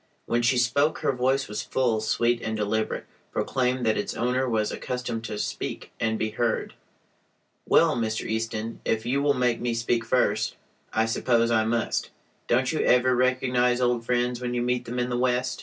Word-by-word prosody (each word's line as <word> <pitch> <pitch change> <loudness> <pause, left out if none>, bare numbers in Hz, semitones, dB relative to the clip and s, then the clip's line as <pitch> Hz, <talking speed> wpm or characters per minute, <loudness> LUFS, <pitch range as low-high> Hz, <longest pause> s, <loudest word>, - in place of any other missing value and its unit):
When 120 0 +1
she 120 +2 +3
spoke 140 +6 +2
her - - +2
voice, 130 +1 +1 0.2
full, 120 -4 0
sweet, 120 +2 +1
and 110 0 -3
deliberate, 110 +1 -1 0.3
proclaimed 125 -1 0
that 110 -1 +2
its 105 - -3
owner 125 +2 0
was 110 -2 0
accustomed 125 -3 -4
to 105 - -4
speak - - -4
and 110 -1 0
be 110 0 -1
heard. 115 +1 -1 0.9
"Well, - - +4
Mr. 110 -2 -2
Easton, 110 0 -3
if 110 0 -1
you 135 +3 +1
will 145 0 +3
make 125 -2 +1
me 120 -1 -1
speak 115 0 0
first, - - +1 0.4
I 110 0 +2
suppose 115 +1 +1
I 110 -2 +3
must. 115 0 -1 0.4
Don't 125 +1 +2
you 155 - -1
ever 125 +1 +4
recognize 125 -1 +2
old 120 -2 +1
friends 125 0 0
when 125 0 -2
you 120 - 0
meet 125 0 0
them 120 +2 -5
in 125 0 -1
the 120 - 0
West?" 125 0 0
120 Hz, 180 wpm, -26 LUFS, 115-125 Hz, 0.9 s, Well